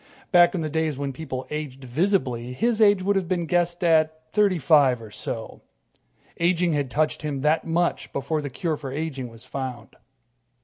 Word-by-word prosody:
Back 175 0 +6
in 175 - -1
the 155 - -1
days 160 -2 0
when 140 -1 -3
people 130 -3 -5
aged 145 -3 -5
visibly, 125 - 0
his 225 - 0
age 205 -3 +5
would 200 +1 +2
have 190 -3 0
been 175 -1 -1
guessed 175 +1 0
at 160 -1 +2
thirty 205 -3 +3
five 140 -4 +4
or 110 -2 -11
so. - - -6 0.8
Aging 170 0 +2
had 145 -3 -1
touched 155 +4 0
him 145 -3 -3
that 150 +3 +2
much 170 +1 0
before 155 +3 -2
the 145 - -4
cure 155 +4 -2
for 140 -3 -7
aging 140 -3 -4
was 115 -1 -14
found. 130 -4 -6
155 Hz, 180 wpm, -24 LUFS, 135-175 Hz, 0.8 s, Back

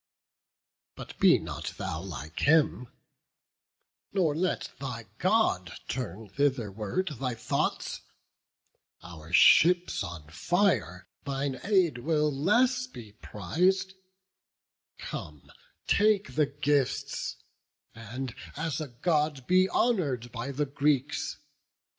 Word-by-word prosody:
But - - -9
be - - +6
not - - -6
thou 85 -4 -4
like 80 -4 -7
him, 150 -5 +3 1.2
nor 170 -7 +1
let 180 +3 -1
thy 125 -4 -5
God 175 - +2
Turn 115 -4 -5
thitherward 120 - -1
thy 125 -3 -2
thoughts; 110 - -2 1.0
our 80 -2 -11
ships 175 - +5
on 85 -5 -8
fire, 170 - 0 0.2
Thine 135 -1 -2
aid 185 - +2
will 150 +2 +1
less 250 - +2
be 115 - -11
priz'd; 180 - 0 1.0
come, 75 -2 -8 0.3
take 210 0 +2
the 150 -2 +2
gifts, 145 -2 -1 0.6
And 115 +3 -6 0.2
as 160 +1 -2
a 155 - -4
God 150 +1 0
be 185 +3 +4
honour'd 145 - 0
by 115 +4 -5
the 145 +2 -1
Greeks. 140 -1 0
140 Hz, 100 wpm, -29 LUFS, 115-175 Hz, 1.2 s, be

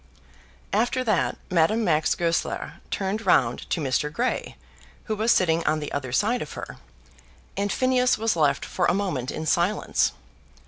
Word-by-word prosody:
After 240 +5 +1
that 215 -7 +1
Madame 185 +7 +3
Max 155 -5 +2
Goesler 170 -1 -2
turned 200 +3 -2
round 125 - +2
to - - 0
Mr. 150 +1 0
Grey, 245 +11 -2 0.5
who 215 - -2
was 220 +3 +2
sitting 165 -2 +3
on 155 0 +2
the 150 - -5
other 130 -3 -3
side 225 - +1
of 150 - -6
her, - - -8 0.8
and 200 0 -1
Phineas 255 +1 +2
was 225 -2 0
left 145 -4 +2
for 180 - 0
a - - +2
moment 180 -11 -2
in 160 - -4
silence. 175 +6 +1
180 Hz, 155 wpm, -25 LUFS, 155-220 Hz, 0.8 s, Madame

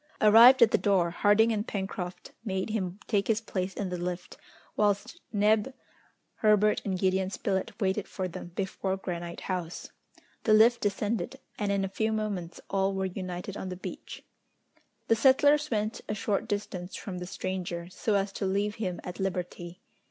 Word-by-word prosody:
Arrived 235 +4 +8
at 225 - +4
the - - +3
door, 185 -5 +2
Harding 205 +5 +4
and 215 0 -1
Pencroft 190 -3 -5
made 190 -1 -2
him 190 -3 -2
take 200 -3 +1
his 225 -1 +2
place 190 -4 -3
in 200 -3 -3
the 180 -1 -4
lift, 180 0 -4 0.4
whilst 205 - 0
Neb, 215 +4 +2 0.6
Herbert, 210 -1 +3
and 190 -2 -1
Gideon 190 0 +1
Spilett 200 +2 -2
waited 195 -1 0
for 185 -1 -3
them 175 - -7
before 190 0 -2
Granite 175 -2 -5
House. 180 -3 -4 0.5
The 215 - +5
lift 235 +2 +5
descended, 210 +5 -1 0.2
and 205 -2 0
in 195 -1 +1
a - - -2
few 220 +3 -1
moments 200 -6 -3
all 195 0 +1
were 190 0 -1
united 185 +1 -5
on 190 - -5
the 180 - -4
beach. - - -8 0.8
The 225 - +4
settlers 285 +5 +4
went 215 -1 -1
a 210 - -1
short 205 -1 -1
distance 195 -3 -4
from 185 -3 -6
the 180 - -6
stranger, 185 -3 -4
so 210 +3 0
as 195 0 +1
to 195 0 -3
leave 205 +2 0
him 180 -4 -2
at 180 +2 -7
liberty. 180 -1 -4
195 Hz, 170 wpm, -29 LUFS, 185-215 Hz, 0.8 s, Arrived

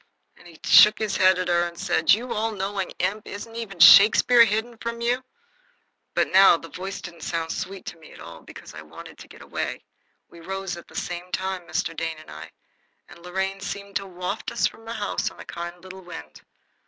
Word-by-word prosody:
And - - -17
he 165 -2 -16
shook 210 0 +7
his 215 -2 -2
head 185 0 +5
at 185 0 -2
her 175 0 +2
and 170 0 -11
said, 175 -2 +1
"You 235 +5 +2
all 225 +1 -1
knowing 195 -1 -3
imp! 200 +4 -2
isn't 225 +3 -8
even 210 -6 -7
Shakespeare 220 +7 +8
hidden 220 +2 -3
from 235 0 -5
you?" 245 +2 0 0.9
But - - +1
now 190 -2 +7
the 165 - -12
voice 190 +2 -6
didn't 170 -2 -10
sound 165 0 -3
sweet 190 0 -6
to - - -8
me 160 -1 -16
at - - -14
all, 85 -1 -11
because - - -12
I 80 - -9
wanted 80 +1 -13
to - - -12
get - - -14
away. - - -5 0.4
We 170 - -16
rose 190 +1 -5
at 170 - -12
the - - -17
same 175 0 -4
minute, 190 -2 -3
Mr. 165 - -2
Dane 160 -1 -4
and 155 - -14
I, 75 +2 -10 0.6
and - - -14
Lorraine 190 +2 -3
seemed 200 0 -7
to 195 -1 -7
waft 180 +3 -5
us - - 0
from 225 - -4
the 230 - -5
house 205 -3 -2
on - - -18
a - - -10
kind 175 +1 -7
little 190 0 -10
wind. 75 - -11
190 Hz, 215 wpm, -24 LUFS, 170-205 Hz, 0.9 s, Shakespeare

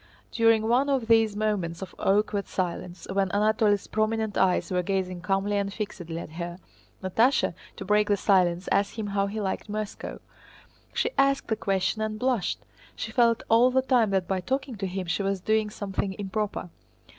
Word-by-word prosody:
During 225 -1 +3
one 255 +5 +3
of 265 -4 +1
these 225 -2 +4
moments 195 -5 -1
of 185 - -9
awkward 205 0 +1
silence 180 -1 -4
when 195 -1 +1
Anatole's 210 0 +2
prominent 220 -1 -1
eyes 185 0 +2
were 180 -1 +2
gazing 185 -1 -2
calmly 195 +2 0
and 200 0 -1
fixedly 180 -6 -5
at 165 - -7
her, 170 +1 -5 0.5
Natásha, 225 +8 +2 0.2
to 195 - -7
break 210 +1 +3
the 205 - +2
silence, 180 -3 +2
asked 200 0 +1
him 220 -2 -3
how 200 -1 0
he 215 +2 -4
liked 200 +1 -3
Moscow. 210 0 -5 0.7
She - - 0
asked 275 0 +2
the 220 - +2
question 195 +1 0
and 215 0 -2
blushed. 245 -6 0 0.3
She - - -5
felt 235 -3 +3
all 235 +3 +5
the 260 +1 +2
time 245 -5 +3
that 190 -2 0
by 190 -1 -1
talking 265 +3 -2
to 195 -1 -2
him 185 0 -4
she 170 +4 -1
was 195 -1 -1
doing 215 +2 +1
something 195 -2 -3
improper. 205 -3 -3
205 Hz, 180 wpm, -27 LUFS, 190-220 Hz, 0.7 s, all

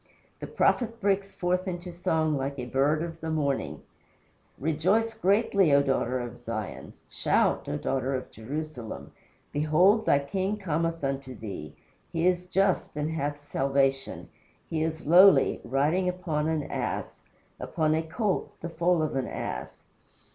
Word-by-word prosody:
The - - -6
prophet 230 -2 +1
breaks 195 -1 0
forth 180 +1 0
into 175 0 -4
song 160 -3 +1
like 140 +1 -3
a 125 - -4
bird 140 +5 +1
of 165 -1 -7
the 160 - -3
morning: 140 - -1 0.7
"Rejoice 185 +10 +1
greatly, 200 -4 +3
O 140 - +5
daughter 130 -2 0
of 120 0 -6
Zion; 115 -4 -5
Shout, - - +1
O 75 - -1
daughter 135 - -1
of 130 - -5
Jerusalem: 130 0 -6 0.4
Behold, 175 +9 +3
thy - - +6
king 190 +9 -2
cometh 165 -3 -1
unto 135 -1 -3
thee. 95 -9 -7 0.4
He 165 +1 0
is 180 0 +2
just 190 -4 +1
and 150 +1 -1
hath 145 -2 -3
salvation; 135 0 0 0.4
He 160 -1 -2
is 160 0 -2
lowly, 175 -3 +6
riding 150 +8 +1
upon 165 -4 -2
an 160 -2 0
ass - - -4 0.4
Upon 155 -1 0
a 160 - +1
colt, 190 +5 -2
the 170 - -4
foal 170 0 +2
of 155 - -2
an 130 -2 -1
ass." 60 - -5
155 Hz, 145 wpm, -28 LUFS, 135-180 Hz, 0.7 s, thy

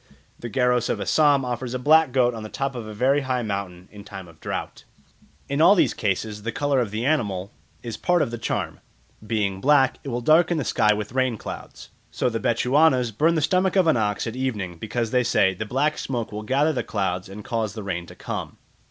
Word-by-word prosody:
The 120 - -6
Garos 125 0 +1
of 105 - -1
Assam 140 - +3
offer 125 +1 -3
a 125 +1 -3
black 155 +3 +4
goat 125 -1 +2
on 115 - -6
the 110 - -7
top 135 +3 -3
of 120 -3 -6
a 110 - -7
very 135 +6 +2
high 130 -2 -1
mountain 100 -4 -5
in 105 -1 -11
time 95 -3 -9
of 80 -1 -17
drought. - - -5 0.6
In 140 +2 -1
all 180 +5 +7
these - - +3
cases 105 +1 -2
the 115 +3 -3
colour 145 +2 0
of 120 -4 0
the 110 +4 -3
animal 105 -10 0 0.3
is 115 -2 -5
part 175 -2 +2
of 115 - -4
the 120 - -5
charm; 115 - -3 0.4
being 105 -3 -1
black, 135 -1 +3
it 140 - -5
will 120 -1 -2
darken 160 +5 +4
the 150 - -1
sky 105 -2 +2
with 105 0 -2
rain 130 -2 0
clouds. - - -9 0.2
So 125 - -1
the 115 - -2
Bechuanas 125 +1 +2
burn 165 +8 +3
the 160 - +1
stomach 185 +4 +1
of 190 -2 +4
an 160 - +4
ox 105 -3 0
at 115 0 -5
evening, 105 -10 -3
because 115 +1 -3
they 125 -1 +3
say, 95 -5 +3
"The 110 +4 -6
black 150 +6 0
smoke 120 -4 -3
will 105 0 -5
gather 140 +8 +1
the 130 - -1
clouds 95 -2 -2
and 100 +2 -9
cause 110 -4 -2
the 110 - -6
rain 85 -3 -4
to - - -12
come." - - -6
120 Hz, 225 wpm, -24 LUFS, 105-135 Hz, 0.6 s, all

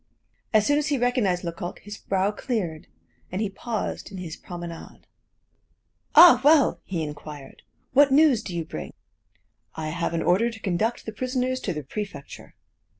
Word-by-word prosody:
As 215 -2 +4
soon 290 +4 +3
as 300 - -1
he 290 - +1
recognized 240 -8 +1
Lecoq, 170 0 -5
his 205 0 -9
brow 195 +1 0
cleared, 200 -8 -3 0.4
and 185 - -3
he 210 -2 -1
paused 220 0 -4
in 195 - -8
his 175 -3 -6
promenade. 175 -2 -9 1.1
"Ah, 330 -9 +9
well!" 295 -1 +5
he 170 -4 -3
inquired, 150 -2 -9 0.3
"what 280 +1 +6
news 280 -5 +5
do 185 -5 -7
you 165 -2 -2
bring?" 75 - -7 0.8
"I 155 -1 -4
have 170 +1 -2
an 165 - -1
order 210 +7 +3
to 225 -1 -10
conduct 220 +4 -1
the 220 - -4
prisoners 255 +2 -1
to 195 - -3
the 150 -1 -5
prefecture." 195 -1 -8
200 Hz, 160 wpm, -25 LUFS, 170-245 Hz, 1.1 s, Ah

